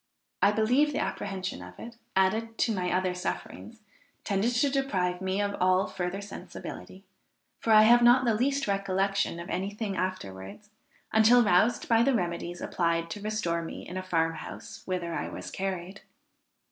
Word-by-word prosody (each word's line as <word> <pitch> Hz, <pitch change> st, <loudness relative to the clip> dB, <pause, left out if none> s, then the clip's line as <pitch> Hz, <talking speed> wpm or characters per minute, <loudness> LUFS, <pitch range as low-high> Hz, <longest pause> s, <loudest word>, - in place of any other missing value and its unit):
I 200 Hz, -, +5 dB
believe 245 Hz, +8 st, +3 dB
the -, -, -1 dB
apprehension 190 Hz, -, -3 dB
of 90 Hz, 0 st, -11 dB
it, 235 Hz, 0 st, -9 dB, 0.2 s
added 220 Hz, +4 st, +1 dB
to 230 Hz, -, +1 dB
my 180 Hz, -3 st, -1 dB
other 185 Hz, 0 st, +1 dB
sufferings 215 Hz, +4 st, -6 dB, 0.4 s
tended 200 Hz, +2 st, +1 dB
to 245 Hz, +4 st, +2 dB
deprive 190 Hz, -10 st, 0 dB
me 190 Hz, +1 st, -1 dB
of 200 Hz, 0 st, -2 dB
all 185 Hz, +1 st, +4 dB
further 180 Hz, +2 st, -4 dB
sensibility, 195 Hz, -1 st, -9 dB, 0.5 s
for 225 Hz, -, 0 dB
I 215 Hz, 0 st, +8 dB
have 240 Hz, +2 st, +6 dB
not 245 Hz, +2 st, +6 dB
the 230 Hz, -, +3 dB
least 270 Hz, +5 st, +1 dB
recollection 195 Hz, -2 st, 0 dB
of 170 Hz, -, -7 dB
any 190 Hz, +2 st, -1 dB
thing 205 Hz, -1 st, -4 dB
afterwards 185 Hz, -, -5 dB, 0.4 s
until 230 Hz, +3 st, +6 dB
roused 215 Hz, +4 st, +3 dB
by 230 Hz, -1 st, +4 dB
the 265 Hz, +2 st, +3 dB
remedies 175 Hz, -2 st, -3 dB
applied 170 Hz, -1 st, -1 dB
to 205 Hz, -, -6 dB
restore 210 Hz, -6 st, -1 dB
me 165 Hz, -, -7 dB
in 180 Hz, -, -7 dB
a 185 Hz, -, -2 dB
farm 165 Hz, -3 st, 0 dB
house -, -, -9 dB
whither 180 Hz, -2 st, -2 dB
I -, -, -3 dB
was -, -, -7 dB
carried. 190 Hz, 0 st, -4 dB
195 Hz, 170 wpm, -28 LUFS, 180-225 Hz, 0.5 s, I